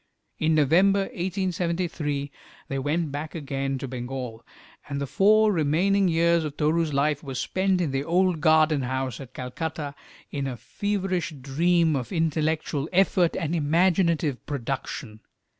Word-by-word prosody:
In 155 0 +2
November, 180 +7 +4
1873, 175 - -2 0.4
they 135 - -2
went 150 +3 -1
back 150 +3 -5
again 135 -3 -2
to 135 - -5
Bengal, 125 -2 -6 0.5
and 140 -1 -3
the 140 - -1
four 215 +8 +4
remaining 185 +4 +2
years 170 0 +3
of 150 -1 -5
Toru's 160 +1 +1
life 145 +1 +1
were 135 -3 -6
spent 190 +7 0
in 165 -6 0
the 135 +1 -1
old 175 0 +1
garden 155 -1 +4
house 130 -1 -2
at 130 -2 -11
Calcutta, 145 +3 -4 0.4
in 140 -2 -2
a 125 -2 -4
feverish 185 - -2
dream 160 +4 +2
of 125 -4 -3
intellectual 155 -2 0
effort 185 -2 +3
and 165 -3 -2
imaginative 165 -2 +2
production. 130 -4 -4
155 Hz, 140 wpm, -25 LUFS, 140-175 Hz, 0.5 s, November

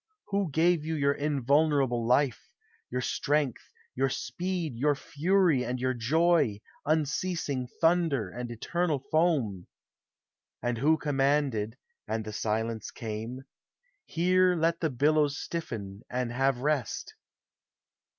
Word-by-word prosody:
Who 200 -3 0
gave 165 +2 +2
you 160 +1 -2
your 140 -1 +2
Invulnerable 140 -3 +1
life, 125 -2 +1 0.4
Your 125 +1 -2
strength, 145 0 -1 0.2
your 135 +1 +1
speed, 175 -1 -3
your 145 +5 +2
fury, 165 -1 +2
and 125 +1 -3
your 130 +1 0
Joy, 145 -2 +2 0.3
Unceasing 155 -3 0
thunder 165 - +2
and 120 +1 -5
eternal 160 +7 -1
foam? 140 - +1 0.9
And 120 -1 -2
who 155 +5 +4
commanded 135 -6 0 0.3
(and 110 0 -2
the 110 - -6
silence 110 +1 -2
came), 115 +3 -6 0.7
Bere 180 +2 +4
let 165 +1 +1
the 160 - 0
billows 145 +2 +2
stiffen, 105 - -5
and 125 -1 -2
have 135 0 +1
rest? 145 -4 -1
140 Hz, 115 wpm, -29 LUFS, 120-160 Hz, 0.9 s, who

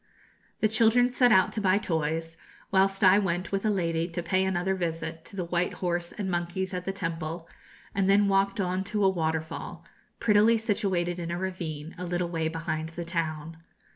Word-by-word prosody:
The 215 - +5
children 230 +3 +4
set 245 -1 +4
out 190 -2 +4
to 215 - -2
buy 190 0 +3
toys, 165 -3 -2 0.4
whilst 195 +1 +2
I 190 +2 +7
went 180 -2 -2
with 195 0 -1
a - - +3
lady 170 -4 0
to 170 +1 -4
pay 185 +3 +1
another 190 0 0
visit 165 -2 -3
to - - -11
the 180 -3 -2
white 175 +1 0
horse 175 -1 -2
and 205 - -4
monkeys 175 +1 -2
at 180 0 -4
the 195 - -1
temple, 165 -3 -4 0.5
and 195 -1 +1
then 200 +1 +5
walked 195 +2 +2
on 185 0 0
to 210 0 0
a - - +6
waterfall, 160 -3 -3 0.3
prettily 220 +1 +4
situated 195 -6 -1
in 170 -1 -4
a 170 - -2
ravine, 170 -4 -5
a - - -4
little 175 0 -1
way 165 -2 -1
behind 160 -1 -3
the 170 +1 -6
town. 165 -2 -3
180 Hz, 190 wpm, -28 LUFS, 165-195 Hz, 0.5 s, I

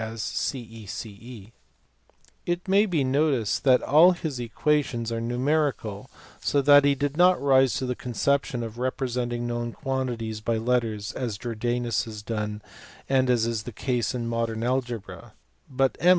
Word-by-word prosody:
215 115 -1 -6 1.1
may 195 +2 +4
be 165 -7 +1
noticed 135 -4 +1
that 130 -2 +4
all 165 +6 +6
his 155 -7 -4
equations 120 -1 0
are 115 0 -2
numerical 125 -4 -1 0.3
so 145 - +1
that 145 +1 +7
he 140 0 +3
did 145 +1 -2
not 180 +2 +5
rise 135 -2 +4
to 130 - -2
the 125 - -1
conception 125 +1 -1
of 115 +1 -7
representing 125 -2 -2
known 120 0 -3
quan 130 +2 -2
tities 110 -3 -5
by 115 0 0
letters 115 -2 -1
as 120 -6 -4
Jordanus 120 +1 -1
had 105 -2 -9
done 105 -2 -3 0.4
and 130 -1 +2
as 120 -2 +3
is 115 -2 -1
the 120 - -8
case 125 +2 -1
in 120 -1 -3
modern 115 -1 -2
algebra: 120 -3 -3 0.4
but 135 0 +1
M. 175 - +4
120 Hz, 150 wpm, -26 LUFS, 115-135 Hz, 1.1 s, that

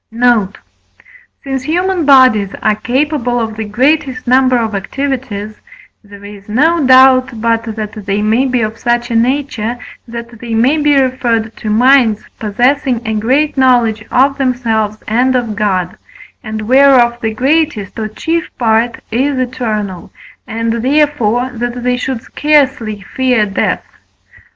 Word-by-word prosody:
Note. 230 -4 +1 0.9
Since 270 -1 -3
human 350 +3 -1
bodies 255 -8 +4
are 215 - +3
capable 250 +2 -1
of 220 -2 -3
the 220 0 -4
greatest 260 +5 0
number 255 0 +3
of 225 -2 -2
activities, 215 -1 -4 0.5
there 200 -1 -14
is 205 0 -12
no 315 +8 +2
doubt 255 -2 +5
but 230 0 0
that 215 -1 -5 0.2
they 205 +1 0
may 225 +5 +2
be 250 -2 0
of 215 +1 -4
such 240 0 -1
a - - -1
nature, 245 -1 -1 0.3
that 235 0 -9
they 230 -1 -4
may 255 +7 +2
be 295 -2 +3
referred 235 -4 -1
to 215 - -5
minds 240 -1 +3 0.2
possessing 245 +3 0
a 220 - -1
great 265 +7 0
knowledge 240 -5 +2
of 275 +2 +2
themselves 225 -5 -1
and 250 +4 +1
of 235 -4 -2
God, 185 -4 -1 0.5
and 215 -1 -5
whereof 250 -1 +4
the 225 - -1
greatest 270 -6 0
or 215 - -2
chief 325 +9 -3
part 230 0 0
is 265 +4 0
eternal, 220 -7 -3 0.4
and, 230 0 -2
therefore, 260 -3 +1
that 240 +1 -4
they 250 0 +1
should 250 -1 -4
scarcely 270 -8 0
fear 250 -4 +2
death. 200 -1 -2
240 Hz, 140 wpm, -13 LUFS, 220-265 Hz, 0.9 s, doubt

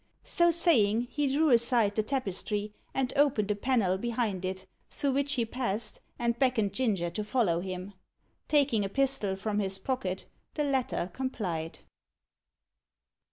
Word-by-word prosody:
So 345 0 +3
saying, 245 - +3
he 295 -1 0
drew 300 +1 +3
aside 235 -3 +3
the 215 - +1
tapestry, 210 -3 -2 0.2
and 265 -2 -1
opened 265 -8 +3
a - - +1
panel 205 -5 +1
behind 225 -5 -1
it, 185 0 -4 0.2
through 280 - -1
which 280 +1 0
he 240 -4 +1
passed, 225 -2 -3 0.2
and 235 0 0
beckoned 240 -7 +2
Ginger 200 -8 0
to 210 - -3
follow 210 -7 +1
him. 185 +2 -5 0.5
Taking 280 -8 +3
a 195 - -2
pistol 260 -6 +1
from 205 +2 -2
his 190 -1 -1
pocket, 190 -4 -3 0.3
the 300 - 0
latter 260 -10 -1
complied. 185 -11 -3
225 Hz, 145 wpm, -29 LUFS, 195-265 Hz, 0.5 s, So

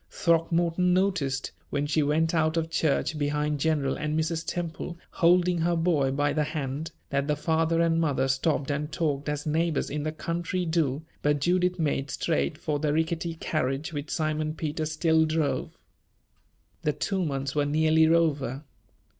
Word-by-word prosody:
Throckmorton 170 +1 +2
noticed, 175 -9 0 0.2
when 145 +1 -1
she 155 +1 +1
went 155 +3 +1
out 160 0 +2
of 165 0 -1
church 155 0 0
behind 150 0 0
General 145 -3 +1
and 155 +1 -1
Mrs. 160 +1 -1
Temple, 170 0 -4
holding 175 0 +3
her 170 +1 +1
boy 165 -5 +2
by 145 +2 +1
the 150 0 +1
hand, 150 0 -3 0.2
that 140 0 0
the 150 - +1
father 160 +2 +1
and 165 0 +2
mother 135 -4 +1
stopped 140 +1 0
and 150 +2 -2
talked 150 -3 -1
as 150 0 -3
neighbors 160 0 0
in 150 +1 -2
the 155 +1 -2
country 170 +3 -2
do, 160 -3 0 0.2
but 145 0 +2
Judith 180 +4 +1
made 145 -4 -1
straight 160 +1 -1
for 150 -3 -2
the 150 0 0
rickety 160 +2 -1
carriage 150 -1 -2
which 145 +1 -5
Simon 155 -1 -1
Peter 155 0 -2
still 160 +1 +2
drove. 155 -1 -1 1.0
The 150 - 0
two 190 +3 -1
months 135 -3 -2
were 145 -1 +1
nearly 160 +1 +4
over. 150 -5 +1
155 Hz, 165 wpm, -27 LUFS, 145-165 Hz, 1.0 s, nearly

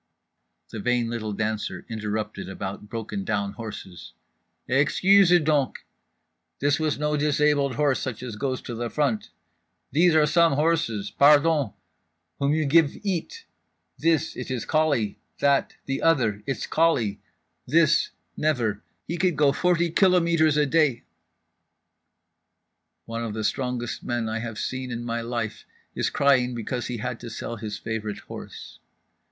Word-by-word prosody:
_"… - - -52
The 110 - -6
vain 120 +1 0
little 110 -2 -3
dancer 105 +1 -3
interrupted 105 -2 -4
about 100 +2 -6
"broken 110 -4 -4
down 100 -1 -1
horses"… 105 -6 -9 0.5
"Excuses 175 +7 +5
donc—this 145 0 -3
was 155 -2 0
no 150 +1 0
disabled 145 -2 +2
horse, 145 -3 +2
such 125 -2 -5
as 120 -4 -6
goes 130 +3 -3
to 120 - -6
the 120 +1 -3
front—these 110 - -1
are 155 -1 +6
some 165 +1 +4
horses—pardon, 145 -1 +3 0.7
whom 140 0 +1
you 155 0 +1
give 150 +1 +4
eat, 205 - -3 0.5
this, 160 -1 +1
it - - -6
is 125 -3 -3
colique, 145 -10 +1 0.2
that, 140 -1 +2
the 135 0 -2
other, 120 -11 +2
it's 135 - -2
colique—this 155 +2 +1 0.3
never—he 125 - -2
could 180 -2 +1
go 145 -1 +4
forty 170 +1 +1
kilometres 170 -5 +3
a 150 - +4
day…." 145 -4 +2 2.0
One 115 0 -4
of 110 -2 -4
the 110 - -3
strongest 125 0 -2
men 120 -2 -2
I 110 +1 -2
have 115 -1 -5
seen 130 0 -3
in 120 -1 -4
my 115 0 -2
life 115 -2 -4 0.3
is - - 0
crying 130 -3 +2
because 120 +2 -3
he 125 - -4
has 105 - -4
had - - -4
to 120 - -8
sell 115 +1 -6
his 105 -1 -5
favourite 110 -2 -4
horse. - - -10
130 Hz, 135 wpm, -25 LUFS, 110-155 Hz, 2.0 s, are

